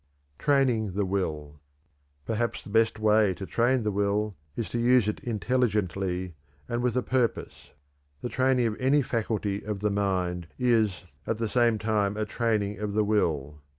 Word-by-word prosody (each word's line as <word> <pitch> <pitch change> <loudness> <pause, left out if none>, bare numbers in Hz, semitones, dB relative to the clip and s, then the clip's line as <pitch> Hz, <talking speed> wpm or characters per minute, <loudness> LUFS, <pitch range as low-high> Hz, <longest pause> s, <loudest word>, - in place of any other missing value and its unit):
TRAINING 125 -8 +2
THE 100 +1 0
WILL. 75 -6 -3 0.7
Perhaps 115 +1 -2
the - - -11
best 110 0 +3
way 105 -3 +3
to 95 - -6
train 120 +4 +1
the 105 - 0
will 100 +1 0 0.2
is 115 - -3
to 120 - -2
use 120 -2 +4
it 105 - -2
intelligently, 100 - -1 0.3
and 120 0 -2
with 125 -1 0
a 125 - +1
purpose. 125 -3 -1 0.5
The - - -2
training 130 -1 +2
of 110 -2 0
any 140 +2 +3
faculty 105 -4 -2
of 105 -2 -4
the 105 -1 +1
mind 90 -4 -1
is 115 -7 +2 0.2
at 115 - 0
the 115 0 -1
same 120 0 +2
time 105 -1 0
a 110 - 0
training 105 -3 -1
of 105 -1 -3
the 105 +1 +2
will. 75 -9 0
105 Hz, 165 wpm, -27 LUFS, 100-120 Hz, 0.7 s, use